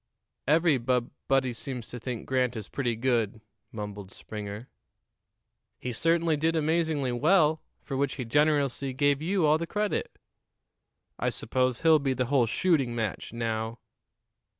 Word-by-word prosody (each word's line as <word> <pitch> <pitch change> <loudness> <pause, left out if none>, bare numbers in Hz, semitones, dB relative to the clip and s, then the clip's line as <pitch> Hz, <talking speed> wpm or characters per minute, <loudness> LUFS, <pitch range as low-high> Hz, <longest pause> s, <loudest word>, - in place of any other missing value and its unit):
"Every 155 -1 +4
bub 120 0 0 0.2
body 135 -2 +2
seems 125 -1 -6
to 120 - -7
think 120 -1 -5
Grant 125 -2 +1
is 110 -3 -6
pretty 120 -4 -1
good," 115 -3 0 0.3
mumbled 105 -3 -7
Springer. 105 +2 -7 1.1
"He 125 - -4
certainly 165 +4 +2
did 160 +3 +1
amazingly 160 -4 +1
well, 155 +4 +3 0.2
for 135 - -5
which 140 0 0
he 125 - -4
generously 140 0 +1
gave 145 +1 +2
you 180 +1 +1
all 155 +1 +4
the 170 - -3
credit." 210 +2 -2 1.0
"I - - +1
suppose 130 +1 -1
he'll 160 -1 +6
be 135 -2 0
the 125 0 0
whole 125 -4 +4
shooting 135 -3 +1
match, 110 -4 -3
now." 115 0 -2
130 Hz, 145 wpm, -28 LUFS, 120-155 Hz, 1.1 s, he'll